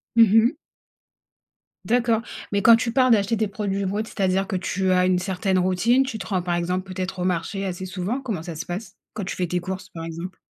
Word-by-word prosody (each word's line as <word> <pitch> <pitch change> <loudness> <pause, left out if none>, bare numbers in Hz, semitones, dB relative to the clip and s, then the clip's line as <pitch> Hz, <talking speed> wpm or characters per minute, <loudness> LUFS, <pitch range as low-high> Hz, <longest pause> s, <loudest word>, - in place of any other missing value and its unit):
Mmh 225 -3 +6
mh. 235 +6 +5 1.3
D'accord, 235 -1 +2 0.3
mais 200 - +2
quand 230 +1 +8
tu 230 0 -2
parles 255 -1 +4
d'acheter 220 +1 +3
tes 215 -1 0
produits 200 -1 -2
bruts, 205 +3 -1
c'est-à-dire 195 -2 0
que 195 - -2
tu 185 +1 0
as 180 0 +4
une 185 -1 +3
certaine 185 0 0
routine, 185 +9 +3
tu 255 -5 -4
te 195 - -7
rends, 185 -1 -1
par 175 0 -1
exemple, 180 +2 -1
peut-être, 185 0 -4
au 180 - -1
marché 185 +2 -1
assez 185 0 -4
souvent? 190 +8 -3
Comment 220 -10 -3
ça 170 0 -7
se 155 - -5
passe 190 +3 -6 0.2
quand 205 - -4
tu - - -4
fais 180 - -1
tes 180 +1 -1
courses, 185 +1 -6
par 165 -2 -7
exemple? 170 +3 -7
190 Hz, 225 wpm, -24 LUFS, 180-220 Hz, 1.3 s, quand